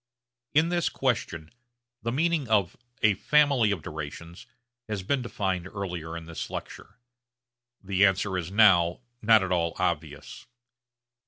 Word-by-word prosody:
In 160 +3 +4
this 175 -1 0
question 85 -11 -2 0.5
the 115 +2 -2
meaning 160 +1 0
of 100 -5 +2 0.3
a 110 -1 +5
'family 140 -2 +3
of 95 -7 -2
durations' 85 +1 -8 0.4
has 105 -3 -3
been 135 +7 0
defined 95 -6 -3
earlier 90 -5 -5
in 85 - -9
this 85 0 -6
lecture. - - -8 0.9
The 95 0 +1
answer 95 0 -1
is 90 -2 -3
now 95 -4 +4 0.2
not 110 -2 +5
at 95 - -3
all 85 -2 0
obvious. 75 - -3
95 Hz, 135 wpm, -27 LUFS, 85-115 Hz, 0.9 s, a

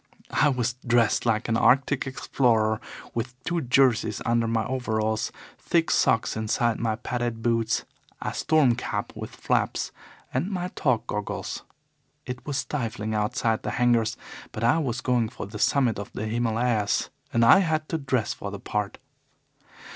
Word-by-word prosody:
I 150 - +4
was 125 -3 0
dressed 120 -1 +2
like 110 0 +1
an 115 - +1
Arctic 135 +3 +3
explorer, 115 -4 +1 0.3
with 120 +1 -3
two 175 +2 -1
jerseys 125 -5 +3
under 115 0 +2
my 115 -1 0
overalls, 110 -4 -1 0.3
thick 165 -1 +1
socks 115 - +2
inside 110 +1 0
my 115 -1 0
padded 120 -1 -3
boots, 115 -1 +1 0.3
a - - -3
storm 155 -6 +3
cap - - -3
with - - -6
flaps, - - 0 0.4
and 135 +9 0
my 180 -2 -2
talc 125 -9 0
goggles. 105 -2 -4 0.6
It 125 -1 -6
was 145 -2 -1
stifling 115 -7 -3
outside 110 +1 0
the - - -3
hangars, 120 -2 +2 0.3
but 110 - -5
I 120 +8 +4
was 130 -5 -2
going 120 -4 +1
for - - -7
the 105 +2 -8
summit 125 -5 +2
of 100 - -7
the 110 - -3
Himalayas, 115 -1 0 0.2
and 115 - +3
had 155 +3 +5
to 165 - -1
dress 130 -6 0
for 100 - -6
the 100 0 -7
part. 105 0 -3
120 Hz, 155 wpm, -26 LUFS, 110-130 Hz, 0.6 s, had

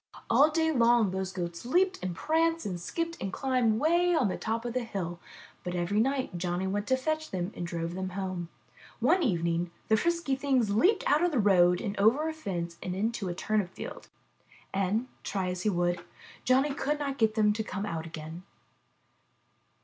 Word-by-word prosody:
All 275 +7 +6
day 320 0 +1
long 235 -6 +4
those 190 0 -3
goats 175 -2 -5
leaped 370 +9 +2
and 180 -2 -3
pranced 330 - +1
and 180 -3 -3
skipped 335 - -3
and 195 - -2
climbed 250 -3 +1
way 345 +3 +3
up - - +3
on - - +2
the - - -2
top 230 +1 -3
of 240 0 -4
a - - +3
hill, 185 -7 -4 0.4
but 180 0 -3
every 175 +4 0
night 260 -6 0
Johnny 175 +1 -1
went 205 +2 -2
to 260 - +3
fetch 310 +3 -2
them 185 +1 -3
and 175 - -4
drove 170 -1 -3
them 185 +1 -3
home. 185 -3 -3 0.5
One 370 - +3
evening 170 - 0 0.2
the 220 - +5
frisky 335 -1 0
things 265 -6 +1
leaped 365 - +3
out 300 +4 +4
of 355 - +4
the 290 - 0
road 180 -4 +5
and 205 -3 -3
over 245 +10 +4
a 320 - -2
fence 175 - -4
and 180 0 -3
into 215 -1 -1
a 175 - -3
turnip 210 -1 0
field, - - -7 0.7
and, 195 +5 +1 0.2
try 190 -2 -2
as 180 0 -4
he 215 - +1
would, 175 -2 0 0.4
Johnny 270 +3 +3
could 295 +1 -1
not 280 -2 -3
get 220 -1 +3
them 210 -2 +4
to 220 +1 -2
come 200 -1 -4
out 165 -4 -4
again.' 160 +1 -8
210 Hz, 195 wpm, -29 LUFS, 180-275 Hz, 0.7 s, All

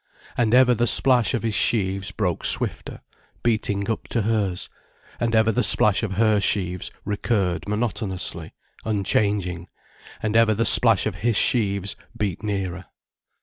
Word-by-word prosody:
And 120 -1 +2
ever 125 -1 +5
the 120 +1 0
splash 125 -1 +2
of 120 - -3
his 115 -2 -1
sheaves 100 -3 0
broke 95 -4 -2
swifter, - - -2 0.4
beating 105 -3 0
up 115 - -3
to 115 - -1
hers, 100 -4 -1 0.5
and 115 -1 0
ever 110 0 +3
the 125 - 0
splash 105 -4 +3
of 110 -4 -3
her 110 0 +2
sheaves 90 -2 -1 0.2
recurred 100 -3 -1
monotonously, 105 -6 -4 0.3
unchanging, 100 -4 -1 0.6
and 110 0 -1
ever 115 -1 +4
the 115 +3 0
splash 115 -5 +5
of 100 -5 -3
his 120 -1 +1
sheaves 100 -4 +1 0.2
beat 100 -5 -3
nearer. 95 -4 -4
105 Hz, 145 wpm, -23 LUFS, 95-115 Hz, 0.6 s, ever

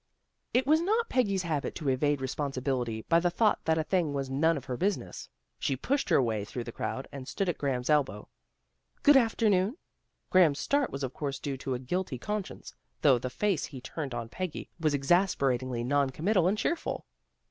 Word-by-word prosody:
It 250 +1 +2
was 310 +3 +4
not 440 +6 +1
Peggy's 200 -7 +1
habit 155 -4 -2
to 150 - -5
evade 140 +2 +1
responsi 135 0 -2
bility 120 -4 -2
by 165 - +5
the 175 +1 +2
thought 215 +4 +2
that 160 0 +2
a 160 - +1
thing 165 -3 0
was 135 -1 -3
none 160 +4 +2
of 140 - -7
her 125 - -3
business. 195 +9 -2 0.3
She 135 - 0
pushed 275 - -1
her - - +5
way 110 -5 0
through 120 +4 -5
the 115 - -7
crowd, 130 +3 -4
and 135 -2 -8
stood 195 - -2
at 175 - -1
Graham's 130 -3 -1
elbow. 135 -8 +1 0.4
" - - -44
Good 290 -1 +7
afternoon." 225 - +3 0.5
Graham's 170 -6 +5
start 285 - +1
was 140 0 -5
of 130 -1 -3
course 140 -2 -3
due 140 -1 -4
to 130 0 -3
a - - -1
guilty 135 +3 -3
conscience, 210 - -5 0.3
though 135 -5 +6
the 130 - -3
face 190 +5 0
he 130 - -9
turned 135 0 -5
on 115 -1 -4
Peggy 180 +6 -5
was 155 -3 +2
exasperatingly 135 -6 +1
non 140 +2 +2
committal 175 +6 +2
and 200 +3 +1
cheerful. 330 +9 -2
145 Hz, 200 wpm, -29 LUFS, 130-190 Hz, 0.5 s, Good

